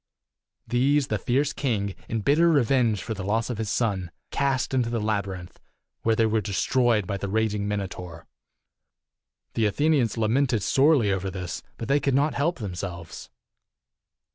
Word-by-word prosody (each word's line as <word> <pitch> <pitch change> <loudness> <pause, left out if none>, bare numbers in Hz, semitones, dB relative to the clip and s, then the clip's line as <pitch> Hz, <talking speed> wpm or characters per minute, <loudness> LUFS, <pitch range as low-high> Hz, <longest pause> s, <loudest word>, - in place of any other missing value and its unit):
These 135 +3 +2
the 105 - 0
fierce 135 +7 +1
king, 105 -8 -1 0.2
in 115 -1 -1
bitter 155 +9 +4
revenge 125 - +2
for 110 - -3
the 95 -3 -6
loss 110 +5 0
of 115 - -5
his 110 -2 -2
son, 100 -7 0 0.2
cast 135 -2 0
into 125 -3 +1
the 115 -1 -1
labyrinth, 100 -4 -3 0.4
where 115 0 +2
they 115 - +3
were 110 0 +1
destroyed 110 +2 +1
by 100 +2 -3
the 100 0 -4
raging 105 -1 0
Minotaur. 90 -5 -5 1.3
The 110 -2 +2
Athenians 140 +1 +1
lamented 115 0 +1
sorely 135 -7 +4
over 95 0 -1
this, 90 -2 -5 0.2
but 115 - -5
they 140 +2 +3
could 140 -1 +1
not 145 +2 +2
help 165 +5 0
themselves. 90 - -6
110 Hz, 155 wpm, -25 LUFS, 100-130 Hz, 1.3 s, bitter